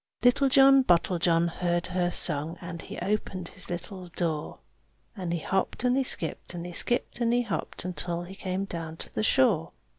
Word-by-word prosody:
Little 250 +3 +4
John 270 0 +7
Bottlejohn 170 -3 +2
heard 175 0 -1
her 180 -1 0
song, 155 -1 +3
And 170 -1 -7
he - - -8
opened 185 -3 -2
his - - -5
little 180 +1 -6
door. 160 -3 -2 0.6
And 180 -5 -4
he 170 - 0
hopped 190 +7 -2
and 250 0 +3
he 270 - +2
skipped, 175 -6 -1
and 170 0 -5
he 175 - -7
skipped 240 +7 -1
and 235 -1 +2
he 245 +1 +2
hopped, 230 - -4
Until 175 -1 -3
he 180 +2 -9
came 190 0 -3
down 165 -4 -6
to - - -9
the - - -1
shore. 215 - +2
180 Hz, 185 wpm, -27 LUFS, 170-215 Hz, 0.6 s, John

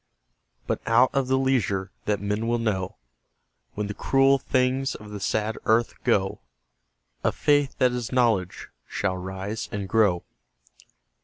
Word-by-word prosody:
But - - -2
out 120 +3 +5
of 135 -2 +1
the 130 0 +2
leisure 105 -8 0
that 105 -1 0
men 105 +3 -2
will 120 0 +2
know, 100 -5 -2 0.8
When 105 - -2
the 105 - -4
cruel 135 +4 +3
things 130 +1 0
of 105 -1 -10
the 105 - -6
sad 110 +2 -1
earth 115 +1 +3
go, 95 -1 +1 0.8
A - - +3
Faith 145 -2 +1
that 125 -1 +3
is 125 -2 -4
Knowledge 110 -8 +1 0.2
shall 95 - -1
rise 95 +4 -5
and 100 -1 -4
grow. 100 -5 +2
110 Hz, 145 wpm, -25 LUFS, 100-130 Hz, 0.8 s, out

